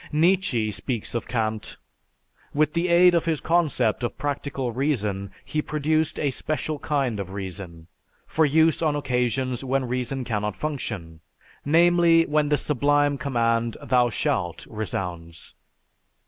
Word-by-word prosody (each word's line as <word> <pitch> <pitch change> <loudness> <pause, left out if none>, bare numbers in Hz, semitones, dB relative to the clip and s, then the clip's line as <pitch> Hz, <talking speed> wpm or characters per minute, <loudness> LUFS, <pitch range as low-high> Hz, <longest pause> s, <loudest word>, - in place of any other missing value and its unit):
Nietzsche 160 - +2
speaks 115 +1 -3
of 120 - -3
Kant: 110 -3 -2 0.8
"With 150 0 +2
the 170 +1 0
aid 175 +1 +6
of 170 -1 +2
his 160 -3 0
concept 150 -10 +1
of 120 - -3
'Practical 140 -3 -3
Reason,' 105 -7 -1 0.2
he 155 - -1
produced 155 +1 0
a 145 - +1
special 155 +2 -3
kind 135 -8 -1
of 95 -2 -4
reason, 95 -4 -7 0.4
for 160 - +1
use 160 +2 +3
on 155 -3 +1
occasions 125 -2 -1
when 135 0 0
reason 125 +2 -2
cannot 105 -3 -2
function: 115 - -5 0.4
namely, 170 +1 +5
when 150 -1 +1
the 150 - +3
sublime 145 0 +1
command, 115 -3 0
'Thou 125 -1 +2
shalt,' 85 -6 -2
resounds." 90 -6 -6
135 Hz, 135 wpm, -24 LUFS, 110-155 Hz, 0.8 s, aid